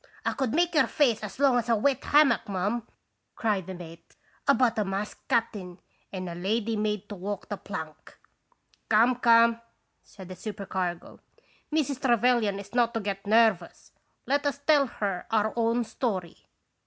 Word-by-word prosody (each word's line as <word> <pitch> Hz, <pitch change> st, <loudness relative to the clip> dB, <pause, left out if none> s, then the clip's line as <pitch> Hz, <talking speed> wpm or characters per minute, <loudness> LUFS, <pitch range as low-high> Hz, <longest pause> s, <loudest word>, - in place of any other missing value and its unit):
" -, -, -26 dB
1 -, -, +1 dB
could 265 Hz, -5 st, -1 dB
make 345 Hz, +4 st, +1 dB
your 300 Hz, -6 st, +4 dB
face 240 Hz, -7 st, +2 dB
as 210 Hz, -3 st, -7 dB
long 270 Hz, -3 st, +4 dB
as 235 Hz, 0 st, -5 dB
a 230 Hz, -, +4 dB
wet 270 Hz, +5 st, +1 dB
hammock, 295 Hz, -6 st, +4 dB
ma'am," 205 Hz, +5 st, -2 dB, 0.5 s
cried 205 Hz, -5 st, -1 dB
the 190 Hz, -, -6 dB
mate, 170 Hz, -1 st, -12 dB, 0.2 s
" -, -, -35 dB
about 250 Hz, -5 st, +3 dB
a -, -, +2 dB
masked 195 Hz, +1 st, -5 dB
cap'n, 215 Hz, -8 st, -1 dB, 0.3 s
and 185 Hz, -2 st, -5 dB
a 170 Hz, -, -5 dB
lady 215 Hz, +6 st, -1 dB
made 210 Hz, -1 st, -2 dB
to 205 Hz, -, -7 dB
walk 200 Hz, +1 st, -6 dB
the 205 Hz, -, -2 dB
plank." 160 Hz, -6 st, -8 dB, 0.4 s
" -, -, -39 dB
Come, 230 Hz, +3 st, +4 dB
come," 230 Hz, -1 st, +4 dB, 0.4 s
said 190 Hz, -3 st, -13 dB
the 185 Hz, -, -7 dB
supercargo, 185 Hz, -3 st, -5 dB, 0.5 s
"Mrs. 290 Hz, -4 st, -1 dB
Trevelyan 240 Hz, -4 st, +2 dB
is 200 Hz, +2 st, -10 dB
not 240 Hz, -1 st, +2 dB
to -, -, +1 dB
get 200 Hz, -1 st, -5 dB
nervous. 215 Hz, -5 st, +2 dB, 0.3 s
Let 285 Hz, +2 st, +1 dB
us 280 Hz, -, -1 dB
tell 285 Hz, -1 st, +3 dB
her 200 Hz, -6 st, -4 dB
our 220 Hz, -1 st, +1 dB
own 235 Hz, +1 st, +1 dB
story. 195 Hz, -8 st, -4 dB
220 Hz, 175 wpm, -27 LUFS, 195-245 Hz, 0.5 s, your